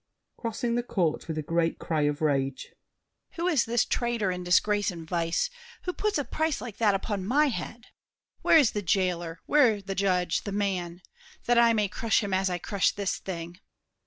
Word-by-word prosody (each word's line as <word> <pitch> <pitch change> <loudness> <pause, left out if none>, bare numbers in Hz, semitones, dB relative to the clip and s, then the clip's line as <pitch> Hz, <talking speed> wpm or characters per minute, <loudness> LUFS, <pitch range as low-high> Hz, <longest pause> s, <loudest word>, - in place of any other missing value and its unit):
[Crossing 235 +1 -3
the 240 - +1
court 180 -9 -1
with 160 -1 -4
a 155 - -2
great 165 +2 0
cry 160 -2 -1
of 145 +1 -4
rage. 135 -3 -1 0.6
Who 345 -1 -2
is 315 -8 +3
this 235 0 +1
trader 235 -5 0
in 180 0 -4
disgrace 205 +4 +2
and 165 -3 -7
vice, 170 - 0 0.3
Who 360 - -2
puts 425 -1 0
a 290 - -1
price 315 -1 -1
like 230 -4 -8
that 210 -3 +3
upon 200 0 -3
my 285 +9 +3
head? 235 -1 -6 0.6
Where - - +6
is 280 -8 +5
the 210 - -2
jailer, 175 -3 -1
where 250 -8 +4
the 195 0 -5
judge, 180 -3 +1
the 205 - -5
man?— 185 -3 -2 0.4
That 240 0 +4
I 235 -1 +5
may 210 -2 +1
crush 220 +4 0
him 200 -1 -3
as 190 0 +2
I 180 - -1
crush 195 +2 +1
this 200 -2 -2
thing. 175 -1 -7
200 Hz, 190 wpm, -27 LUFS, 175-235 Hz, 0.6 s, Where